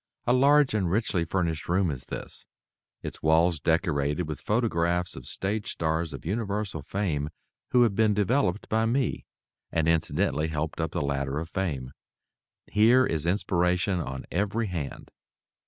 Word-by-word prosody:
A 120 - +3
large 140 +1 +5
and 95 -5 +1
richly 95 -3 +1
furnished 85 -3 -2
room 90 -1 +2
is 65 -4 -7
this, - - -7 0.6
its - - -7
walls 80 +1 +3
decorated 80 -1 +1
with 75 -3 -5
photographs 90 -6 0
of 65 -2 -9
stage 105 +3 -2
stars 80 0 -1
of 70 -2 -8
universal 100 -3 -2
fame 75 -4 -2 0.4
who 125 -1 +5
have 115 -4 +2
been 110 0 +3
developed 105 -1 +1
by 110 +1 +1
me, 130 +2 0 0.5
and 80 -1 +1
incidentally 80 -1 +1
helped 80 +1 -3
up 80 - -1
the 85 -1 -2
ladder 70 0 -1
of 80 +2 -4
fame. 70 -10 -3 0.7
Here 115 +5 +5
is 80 -5 -1
inspiration 90 0 +1
on 65 -5 -5
every 105 +5 0
hand. 85 -8 -5
90 Hz, 150 wpm, -27 LUFS, 80-105 Hz, 0.7 s, large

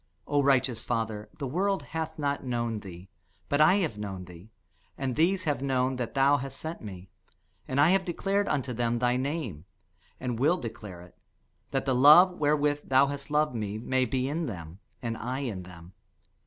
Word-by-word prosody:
O 145 0 +2
righteous 135 -4 +2
Father, 110 -3 -3
the 140 - -4
world 190 +8 0
hath 160 0 -4
not 145 -2 -1
known 120 -3 -2
thee: 95 -2 -11 0.4
but 145 +1 +2
I 155 +5 +6
have 165 - -1
known 95 -3 -5
thee, 90 +3 -13 0.5
and 130 -3 -2
these 185 +4 +2
have 145 -6 -1
known 130 -1 0
that 125 0 -4
thou 140 +1 +4
hast 135 0 -6
sent 160 +1 -6
me. 95 -3 -9 0.6
And 130 +1 -1
I 150 +4 +6
have 190 0 +3
declared 195 +3 -1
unto 135 -3 -1
them 120 0 0
thy 125 +1 +2
name, 130 - -3 0.5
and 125 -3 -3
will 155 +7 +3
declare 105 - -8
it: 90 -1 -16 0.5
that 135 -1 -1
the 135 - +1
love 150 +9 +8
wherewith 145 -1 +1
thou 135 +1 +6
hast 140 +1 -5
loved 150 -2 +2
me 105 -2 -3
may 130 +3 0
be 130 +2 -1
in 160 +3 -2
them, 85 -4 -8 0.2
and 115 -1 -2
I 130 +4 -3
in 110 -9 -4
them. 90 0 -13
130 Hz, 185 wpm, -28 LUFS, 110-150 Hz, 0.6 s, love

